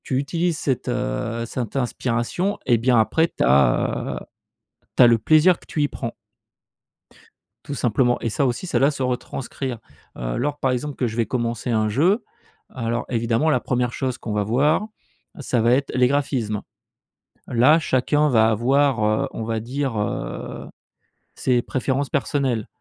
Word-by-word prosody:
Tu 130 Hz, -, -1 dB
utilises 165 Hz, +4 st, -1 dB
cette, 135 Hz, -4 st, -2 dB
heu, 115 Hz, -, -2 dB
cette 120 Hz, 0 st, -5 dB
inspiration, 125 Hz, -, -1 dB
et 120 Hz, -, +4 dB
bien 120 Hz, +1 st, +3 dB
après 160 Hz, +9 st, +2 dB
tu -, -, -3 dB
as, 65 Hz, -2 st, +2 dB
heu, -, -, -11 dB, 0.7 s
tu -, -, +8 dB
as -, -, +8 dB
le 115 Hz, -1 st, +5 dB
plaisir 155 Hz, +9 st, +4 dB
que -, -, -19 dB
tu 150 Hz, -, -3 dB
y 145 Hz, -, +3 dB
prends. 115 Hz, -4 st, -6 dB, 1.5 s
Tout 140 Hz, -, -5 dB
simplement. 120 Hz, 0 st, +1 dB
Et 115 Hz, -, -1 dB
ça 135 Hz, +6 st, 0 dB
aussi, 125 Hz, +7 st, -2 dB
ça 125 Hz, -9 st, 0 dB
la 135 Hz, +3 st, +4 dB
se 140 Hz, -2 st, -4 dB
retranscrire. 125 Hz, 0 st, -4 dB, 0.4 s
Heu, -, -, -3 dB
lors, 145 Hz, +3 st, -1 dB
par 130 Hz, -, +1 dB
exemple 130 Hz, +3 st, -3 dB
que 125 Hz, -, -1 dB
je 110 Hz, -, -5 dB
vais 115 Hz, -1 st, +1 dB
commencer 120 Hz, -1 st, -2 dB
un 110 Hz, -2 st, +1 dB
jeu, 175 Hz, -, +2 dB, 0.5 s
alors 115 Hz, -1 st, -2 dB
évidemment 115 Hz, +5 st, +1 dB
la 155 Hz, -, +3 dB
1re 125 Hz, -1 st, -1 dB
chose 130 Hz, -2 st, -2 dB
qu'on 110 Hz, -, -5 dB
va 105 Hz, 0 st, +1 dB
voir, 145 Hz, -, +2 dB, 0.5 s
ça 125 Hz, -4 st, 0 dB
va 115 Hz, +2 st, +3 dB
être 140 Hz, +2 st, 0 dB
les 125 Hz, -1 st, +4 dB
graphismes. 130 Hz, -7 st, -1 dB, 0.9 s
Là, 130 Hz, +7 st, +5 dB
chacun 150 Hz, +1 st, +1 dB
va 110 Hz, -3 st, +4 dB
avoir, 130 Hz, +2 st, +2 dB
heu, 110 Hz, 0 st, +1 dB
on 115 Hz, -, -5 dB
va 110 Hz, 0 st, -2 dB
dire, 130 Hz, +1 st, -3 dB
heu, 105 Hz, -, -4 dB, 0.7 s
ses 125 Hz, -2 st, +1 dB
préférences 130 Hz, +3 st, -2 dB
personnelles. 135 Hz, -4 st, -1 dB
125 Hz, 170 wpm, -22 LUFS, 115-140 Hz, 1.5 s, tu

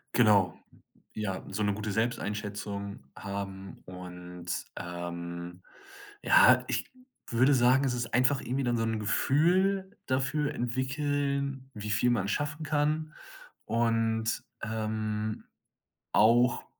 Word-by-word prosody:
Genau, 105 Hz, -7 st, +4 dB, 0.6 s
ja, 95 Hz, -3 st, -3 dB
so 100 Hz, +2 st, -3 dB
'ne 105 Hz, 0 st, +2 dB
gute 105 Hz, +1 st, -4 dB
Selbsteinschätzung 105 Hz, -, -3 dB
haben 95 Hz, -2 st, -6 dB
und, 90 Hz, -1 st, -9 dB, 0.3 s
ähm, 85 Hz, 0 st, -6 dB, 0.6 s
ja, -, -, +7 dB
ich -, -, -2 dB, 0.4 s
würde 130 Hz, +4 st, +4 dB
sagen, 130 Hz, +1 st, +4 dB
es 130 Hz, -, +1 dB
ist 120 Hz, -1 st, -3 dB
einfach 130 Hz, +3 st, +4 dB
irgendwie 135 Hz, +2 st, -2 dB
dann 120 Hz, -1 st, +1 dB
so 115 Hz, -, 0 dB
'n 110 Hz, -1 st, -1 dB
Gefühl 190 Hz, -, +2 dB
dafür 140 Hz, +3 st, 0 dB
entwickeln, 140 Hz, +2 st, -1 dB
wie 105 Hz, -1 st, -6 dB
viel 110 Hz, +4 st, +3 dB
man 100 Hz, -5 st, 0 dB
schaffen 145 Hz, +6 st, -2 dB
kann 155 Hz, +1 st, 0 dB, 0.5 s
und, 115 Hz, -1 st, +1 dB, 0.2 s
ähm, 110 Hz, -1 st, -2 dB, 0.7 s
auch, 120 Hz, +3 st, +4 dB
115 Hz, 110 wpm, -29 LUFS, 100-135 Hz, 0.7 s, ja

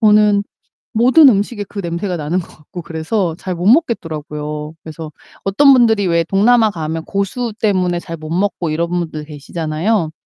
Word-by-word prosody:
저는 210 Hz, -2 st, +4 dB, 0.5 s
모든 255 Hz, +7 st, +6 dB
음식에 205 Hz, 0 st, 0 dB
그 205 Hz, -, -7 dB
냄새가 175 Hz, +1 st, -3 dB
나는 160 Hz, +2 st, -2 dB
것 170 Hz, -, -8 dB
같고 165 Hz, +3 st, -10 dB
그래서 165 Hz, +2 st, -2 dB
잘 185 Hz, -1 st, -4 dB
못 175 Hz, +1 st, -4 dB
먹겠더라고요. 155 Hz, -, -1 dB
그래서 160 Hz, -1 st, -8 dB, 0.3 s
어떤 275 Hz, +9 st, +5 dB
분들이 225 Hz, -5 st, +3 dB
왜 170 Hz, -1 st, +2 dB
동남아 220 Hz, +6 st, +3 dB
가면 160 Hz, -3 st, -4 dB
고수 205 Hz, +4 st, -2 dB
때문에 185 Hz, -4 st, +1 dB
잘 165 Hz, -1 st, -7 dB
못 155 Hz, 0 st, -9 dB
먹고 180 Hz, -1 st, -1 dB
이런 165 Hz, +2 st, -1 dB
분들 160 Hz, -4 st, -3 dB
계시잖아요. 160 Hz, +5 st, -2 dB
175 Hz, 345 characters per minute, -17 LUFS, 160-210 Hz, 0.5 s, 모든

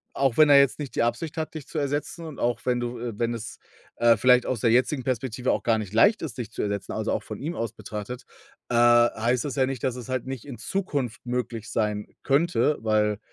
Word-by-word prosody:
auch 135 Hz, -3 st, +1 dB
wenn 155 Hz, -1 st, +6 dB
er 140 Hz, -1 st, +8 dB
jetzt 140 Hz, -2 st, +3 dB
nicht 145 Hz, -3 st, -6 dB
die -, -, +1 dB
Absicht 145 Hz, +7 st, -2 dB
hat, 160 Hz, 0 st, -4 dB
dich 155 Hz, -3 st, -7 dB
zu 160 Hz, -, -4 dB
ersetzen 145 Hz, +4 st, -2 dB
und 155 Hz, -3 st, -9 dB
auch 120 Hz, -1 st, 0 dB
wenn 125 Hz, -1 st, +1 dB
du 120 Hz, 0 st, -4 dB
äh, 115 Hz, -3 st, -5 dB
wenn 120 Hz, 0 st, 0 dB
es, 115 Hz, -1 st, -7 dB, 0.4 s
äh, 115 Hz, -1 st, +5 dB
vielleicht 125 Hz, +2 st, +4 dB
aus 125 Hz, -4 st, -2 dB
der 115 Hz, -, +3 dB
jetzigen 125 Hz, +3 st, +2 dB
Perspektive 125 Hz, 0 st, -1 dB
auch -, -, -1 dB
gar 115 Hz, -2 st, +2 dB
nicht 105 Hz, -3 st, -5 dB
leicht 205 Hz, -, +5 dB
ist, 135 Hz, -8 st, -6 dB
dich 115 Hz, -4 st, -5 dB
zu -, -, -4 dB
ersetzen, 100 Hz, -1 st, -3 dB
also, -, -, -1 dB
auch -, -, -1 dB
von -, -, -7 dB
ihm 160 Hz, +5 st, -4 dB
aus 115 Hz, -2 st, -3 dB
betrachtet, 110 Hz, +4 st, -7 dB, 0.5 s
äh, -, -, -1 dB
heißt 120 Hz, 0 st, +4 dB
das 145 Hz, -2 st, -4 dB
ja 130 Hz, -1 st, +3 dB
nicht, 130 Hz, -3 st, -4 dB
dass 130 Hz, -2 st, 0 dB
es 125 Hz, -3 st, -8 dB
halt 130 Hz, -1 st, -2 dB
nicht 130 Hz, -3 st, -6 dB
in 135 Hz, -4 st, -8 dB
Zukunft 145 Hz, -, -3 dB
möglich 120 Hz, -3 st, -3 dB
sein 105 Hz, -2 st, -1 dB, 0.2 s
könnte, 150 Hz, +1 st, +2 dB
weil 105 Hz, -2 st, +1 dB
125 Hz, 240 wpm, -25 LUFS, 115-140 Hz, 0.5 s, er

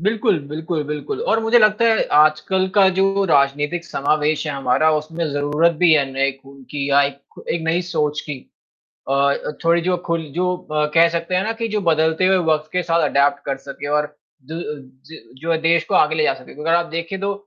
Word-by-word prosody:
बिल्कुल, 210 Hz, 0 st, +1 dB
बिल्कुल, 160 Hz, +1 st, -3 dB
बिल्कुल 150 Hz, -, -5 dB
और 225 Hz, -, +2 dB
मुझे 225 Hz, +2 st, +4 dB
लगता 215 Hz, 0 st, +3 dB
है, 225 Hz, -1 st, +3 dB
आजकल 155 Hz, +5 st, +3 dB
का 195 Hz, -2 st, +6 dB
जो 195 Hz, +1 st, +2 dB
राजनीतिक 145 Hz, +1 st, +1 dB
समावेश 155 Hz, 0 st, -1 dB
है 150 Hz, -, -2 dB
हमारा 140 Hz, +3 st, +1 dB
उसमें 155 Hz, +2 st, -3 dB
ज़रूरत 145 Hz, +4 st, +1 dB
भी 175 Hz, -2 st, +5 dB
है 150 Hz, -3 st, +4 dB
नए 135 Hz, +1 st, +1 dB
खून 135 Hz, 0 st, -15 dB
की 140 Hz, -1 st, -3 dB
या 140 Hz, +1 st, +5 dB
एक 140 Hz, 0 st, -6 dB
एक 170 Hz, -, -2 dB
नई 165 Hz, +2 st, 0 dB
सोच 150 Hz, -3 st, -1 dB
की। 145 Hz, -3 st, -7 dB, 0.7 s
अ -, -, +1 dB
अ, 140 Hz, +1 st, 0 dB
थोड़ी 170 Hz, +1 st, +3 dB
जो 180 Hz, +1 st, 0 dB
खुल 170 Hz, -1 st, -1 dB
जो 180 Hz, +1 st, 0 dB, 0.2 s
अ, 150 Hz, 0 st, +1 dB
कह 165 Hz, 0 st, +6 dB
सकते 170 Hz, +2 st, -3 dB
हैं 185 Hz, -, +1 dB
ना 220 Hz, -, -2 dB
कि 230 Hz, -, -1 dB
जो 210 Hz, -1 st, -2 dB
बदलते 160 Hz, 0 st, +1 dB
हुए 190 Hz, 0 st, +4 dB
वक़्त 155 Hz, 0 st, -1 dB
के 180 Hz, 0 st, -1 dB
साथ 165 Hz, -1 st, +1 dB
एडॉप्ट 140 Hz, 0 st, +2 dB
कर 135 Hz, -1 st, -2 dB
सके 140 Hz, +1 st, -8 dB
और 150 Hz, 0 st, -1 dB, 0.3 s
दु 160 Hz, -, -7 dB
अ, 170 Hz, -, -4 dB, 0.4 s
ज 160 Hz, +2 st, -12 dB, 0.2 s
जो 165 Hz, 0 st, 0 dB
देश 165 Hz, 0 st, +3 dB
को -, -, +1 dB
आगे 155 Hz, +1 st, +3 dB
ले 155 Hz, -, +1 dB
जा 145 Hz, -, +2 dB
सके, 130 Hz, -1 st, -14 dB
अगर 165 Hz, +2 st, 0 dB
आप 170 Hz, 0 st, +2 dB
देखिए 170 Hz, +3 st, -4 dB
तो, 200 Hz, +1 st, -1 dB
160 Hz, 215 wpm, -20 LUFS, 145-180 Hz, 0.7 s, का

